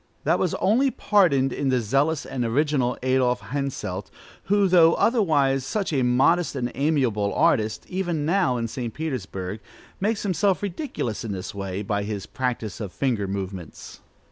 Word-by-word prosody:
That - - +2
was - - 0
only 245 +8 +3
pardoned 155 - +2
in 140 - -1
the 130 -1 +2
zealous 140 +7 +1
and 125 -2 -3
original 130 +1 +1
Adolph 130 -1 +2
Henselt, 130 -9 -3 0.4
who, 205 0 +3
though 170 -2 +6
otherwise 145 - +2
such 195 +5 -2
a 135 - +2
modest 135 +8 +2
and 125 -2 -2
amiable 130 -9 +1
artist, 110 -10 +2
even 175 -5 -2
now, 170 -6 +2
in 115 -1 -2
St. 120 -1 -5
Petersburg, 105 -10 -4 0.4
makes 215 +2 0
himself 195 0 +1
ridiculous 190 - -3
in 110 -3 -3
this 95 -1 -6
way, 100 0 -4
by 100 0 -1
his 100 -1 -4
practice 120 -4 -3
of 100 -4 -5
finger 115 -6 -1
movements. 95 -3 -6
135 Hz, 155 wpm, -24 LUFS, 110-165 Hz, 0.4 s, though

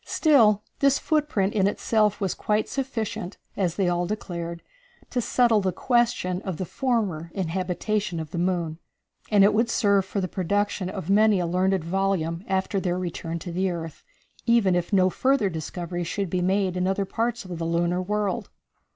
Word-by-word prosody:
Still 225 -10 +4 0.2
this 275 -1 +4
footprint 295 -11 0
in 200 -3 +3
itself 210 0 +1
was 195 -4 0
quite 215 0 0
sufficient, 225 -7 -4 0.2
as 180 -4 0
they 195 -3 +1
all 175 0 0
declared, 170 -4 -5 0.5
to 245 - 0
settle 235 -2 +3
the 190 -1 0
question 235 -6 +1
of 190 -6 -4
the 185 - -3
former 210 - -1
inhabitation 185 +1 -1
of 155 -1 -6
the 170 - -3
moon, 170 -3 -1 0.5
and 205 -2 +5
it 205 - +5
would 230 +2 +2
serve 200 -4 +3
for 195 +2 -3
the 185 - -1
production 195 +1 -1
of 190 -2 -4
many 210 -1 +5
a 175 - 0
learned 185 +1 +1
volume 175 -1 -1
after 190 +1 0
their 180 -1 -1
return 170 -2 -4
to 175 +1 -7
the 185 +2 0
earth, 165 -3 -6 0.4
even 230 -5 +4
if 175 -1 -1
no 185 -2 +4
further 260 -6 +2
discoveries 175 +2 -4
should 195 -1 -2
be 185 - 0
made 190 0 +1
in 180 0 0
other 195 +1 0
parts 230 +2 -2
of 175 -2 -6
the - - -2
lunar 170 +2 0
world. 205 +1 -2
190 Hz, 175 wpm, -25 LUFS, 175-210 Hz, 0.5 s, and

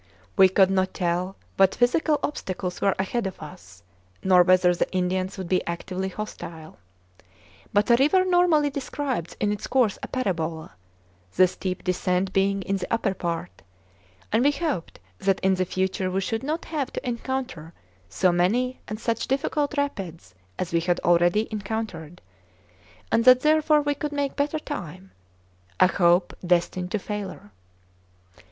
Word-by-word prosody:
We 190 -1 +7
could 190 0 +4
not 190 -1 0
tell 180 +2 -1 0.2
what 195 -1 +4
physical 295 +5 +2
obstacles 185 -9 -4
were 195 - +2
ahead 195 +3 -1
of 190 - -8
us, 95 - -12 0.4
nor 185 -1 +6
whether 180 0 +4
the 175 - -1
Indians 185 +1 -1
would 190 -2 -5
be 185 +1 +1
actively 185 +2 -3
hostile. 170 -5 -8 0.9
But 210 +3 +2
a - - +8
river 335 +8 +4
normally 350 -5 +3
describes 270 - -4
in 205 -1 +1
its 210 0 -4
course 245 -6 +2
a - - -5
parabola, 165 -10 -3 0.6
the 185 - +6
steep 185 0 -5
descent 185 +1 0
being 195 0 +1
in 195 +1 -1
the 180 - -6
upper 225 -4 +1
part; 170 -1 -4 0.7
and 225 +3 +3
we 285 - +5
hoped 290 - -3 0.2
that 195 -1 +1
in 190 0 +3
the 185 0 0
future 185 +1 -1
we 185 +1 -1
should 225 +3 -2
not 305 +5 -3
have 290 -5 -3
to - - -5
encounter 245 - -4 0.4
so 180 - +2
many 230 +9 +1
and 215 0 -5
such 230 -1 -2
difficult 290 +2 -1
rapids 185 - -4 0.2
as 175 -2 -4
we 170 - +4
had 175 +1 0
already 175 +5 +3
encountered, 200 -6 -5 0.9
and 230 - +3
that 255 0 +8
therefore 305 0 +3
we 290 0 0
would 300 - -2
make 285 -1 -2
better 295 +2 0
time 185 - -7 0.7
a - - +7
hope 175 -1 +3
destined 180 +1 0
to 215 - -1
failure. 200 - -6
195 Hz, 155 wpm, -25 LUFS, 180-255 Hz, 0.9 s, a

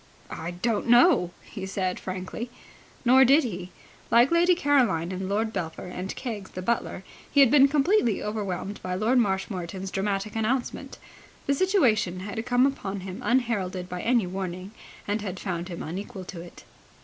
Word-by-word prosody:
"I 165 - -5
don't 205 +6 -1
know!" 240 - +5
he 195 -3 -7
said 185 -1 -2
frankly. 185 +6 -5 0.6
Nor 260 +2 +7
did 275 +5 +5
he. 185 -6 -5 0.4
Like 240 +5 +5
Lady 345 +1 +4
Caroline 245 - +2
and 185 0 -4
Lord 220 +2 0
Belpher 170 -3 -4
and 180 +1 -5
Keggs, 215 -7 -5
the 185 - -7
butler, 220 -3 -1 0.3
he 285 - +2
had 270 -4 +7
been 280 -2 +7
completely 285 - +2
overwhelmed 205 -2 -4
by 180 0 -3
Lord 225 +7 +2
Marshmoreton's 190 -3 -2
dramatic 195 +1 -2
announcement. 240 +3 -2 0.5
The 280 - +2
situation 245 - +2
had 210 +3 -4
come 245 +1 +4
upon 200 -8 -2
him 185 0 -7
unheralded 205 -8 0
by 180 0 -4
any 235 -4 +2
warning, 185 +1 -5 0.4
and 205 +1 -1
had 190 -3 -5
found 175 -3 -3
him 170 - -6
unequal 190 +4 -6
to 175 -2 -8
it. 175 - -12
205 Hz, 160 wpm, -26 LUFS, 185-245 Hz, 0.6 s, Nor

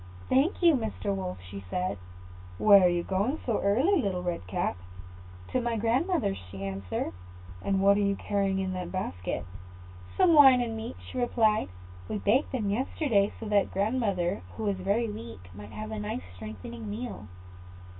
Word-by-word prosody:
"Thank 295 +8 +2
you, 340 -2 +7
Mr. 220 -5 -1
Wolf," 95 - -4 0.3
said 180 - -2 0.6
she. - - -7
"Where 200 -3 +8
are - - +6
you 175 0 0
going 200 - 0
so 230 -4 0
early, 275 - +3
Little 185 -4 -2
Red 170 - -3
Cap?" 90 -1 -1 0.7
"To 255 - 0
my 235 -1 -1
grandmother's," 240 - +1
she 95 +1 -7
answered. 95 -3 -3 0.5
"And 195 - 0
what 200 +1 +6
are - - +2
you 200 0 +2
carrying 195 -1 0
in 190 -1 -1
that 180 -1 -4
basket?" 90 - -3 0.7
"Some 360 -3 +5
wine 270 -4 +8
and 235 -2 -2
meat," 225 +3 -5
she 255 - -5
replied. 220 - +2 0.4
"We - - -1
baked 230 +8 +2
the 255 - -1
meat 205 +2 0
yesterday, 235 -7 +1
so 225 - -6
that 205 -2 +3
grandmother, 200 - 0 0.2
who 220 - -3
is 195 - -1
very 200 +5 0
weak, 115 - -8
might 105 +2 -10
have 105 0 -6
a 110 - -4
nice 105 -4 -4
strengthening 110 +3 -8
meal." 105 -1 -6
200 Hz, 175 wpm, -28 LUFS, -, 0.7 s, Where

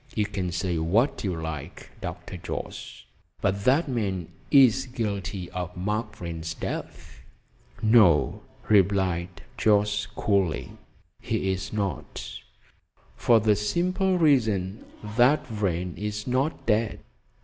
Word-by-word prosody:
You 105 - +2
can 95 -3 -3
say 90 -1 -1
what 100 - +1
you 90 -5 -2
like, 80 -3 -6
Dr. - - -6
Jorce, 60 - -6 0.4
but 100 +1 -1
that 145 +6 +4
man 100 - -2 0.2
is 135 -4 +5
guilty 100 -6 -3
of 90 0 -5
Mark 105 +3 -2
Vrain's 80 -2 -5
death." 65 - -6 0.6
"No," 95 - +5 0.3
replied 90 -4 +2 0.2
Jorce 105 -1 +2
coolly, 95 -6 0 0.5
"he's 95 +1 -2
not, 100 -3 -3 0.9
for 115 -2 +4
the 105 -1 +3
simple 180 - +1
reason 110 - +2 0.3
that 140 +5 +5
Vrain 90 - -2
is 105 0 -4
not 130 +5 -1
dead." 110 0 +1
100 Hz, 110 wpm, -26 LUFS, 90-115 Hz, 0.9 s, is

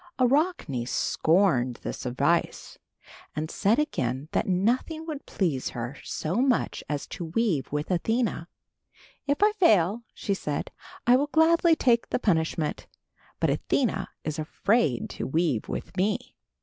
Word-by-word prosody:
Arachne 255 - +1
scorned 155 -7 +2
this - - -4
advice 140 +7 0 0.6
and 155 +1 -3
said 210 +3 +2
again 135 - -1
that - - 0
nothing 240 - 0
would 305 -4 -6
please 155 -10 -1
her 120 +4 -4
so 165 +6 -3
much 255 -1 +1
as 145 -2 -2
to 175 - -6
weave 165 - 0
with 150 +4 -2
Athena. 215 -1 0 0.8
"If 285 +7 +1
I 420 - +6
fail," 220 - +3
she 200 - -2
said, 150 -6 -3 0.3
"I 245 +1 +6
will 280 +3 +2
gladly 325 +2 +4
take 235 -6 +2
the - - +1
punishment, 160 -7 0 0.5
but - - +2
Athena 195 -8 0
is 155 0 -3
afraid 155 - +1
to - - -4
weave 155 -5 0
with - - -5
me." 205 +3 -1
190 Hz, 135 wpm, -27 LUFS, 150-250 Hz, 0.8 s, I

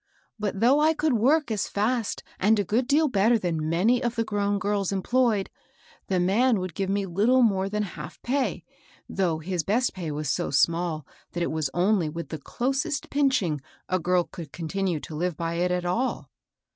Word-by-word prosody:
But 205 -1 -2
though 260 +5 +5
I 315 +1 +3
could 305 -2 +1
work 270 +4 +2
as 210 -3 -1
fast 220 +2 -1 0.2
and 215 +3 +4
a 205 - +2
good 230 +6 0
deal 300 +3 +3
better 225 -1 +3
than 165 -6 -2
many 215 +10 +2
of 240 -2 -1
the 230 - +1
grown 205 -2 0
girls 200 -1 -1
enjployed, 215 +1 +1 0.6
the 185 -2 +1
man 215 +6 +3
would 185 -2 -4
give 195 +3 -2
me 200 0 0
little 215 +8 +3
more 195 -3 +2
than 210 +1 -1
half 195 - -8
pay, 265 +2 -1 0.4
though 175 -5 0
his 175 +2 -2
best 225 +10 +1
pay 175 -4 -5
was 150 0 -3
sq - - -1
small 165 +1 +1 0.3
that 175 - -1
it - - -1
was 155 -3 -1
only 180 -2 +2
with 170 +2 -6
the 160 - -5
closest 270 - -2
pinching 260 - +1 0.3
a 185 - 0
girl 180 +1 +2
could 165 -5 -10
continue 175 0 -2
to - - -9
live 170 +1 -2
by 165 0 -2
it 175 +2 0
at 180 0 -1
all. 230 +9 -1
195 Hz, 195 wpm, -26 LUFS, 175-240 Hz, 0.6 s, though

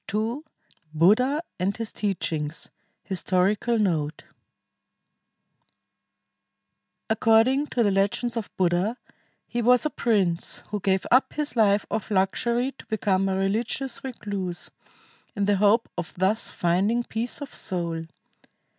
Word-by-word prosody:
II 220 +6 -1 0.6
BUDDHA 250 - +4 0.2
AND 195 +3 0
HIS 225 -1 -4
TEACHINGS 160 -6 -3 0.3
HISTORICAL 195 +5 +1
NOTE 160 -8 0 2.8
According 225 +6 +3
to 240 - +1
the 205 - +3
legends 205 +5 0
of 230 -3 -3
Buddha, 185 +6 +1 0.5
he 240 - -2
was 245 +2 +4
a 305 - 0
prince 190 -7 0
who 210 - -2
gave 190 -1 +1
up 255 +3 +4
his 300 -3 -2
life 205 -3 +3
of 220 - -2
luxury 235 +6 +1
to - - -12
become 195 -3 +1
a 190 - 0
religious 225 +7 -1
recluse, 200 -8 -5 0.6
in 200 -1 0
the 205 0 +2
hope 210 +4 +4
of 175 - -5
thus 195 +5 +2
finding 195 +8 +1
peace 235 +3 -3
of 285 - -8
soul. 170 -3 -3
205 Hz, 120 wpm, -25 LUFS, 190-235 Hz, 2.8 s, BUDDHA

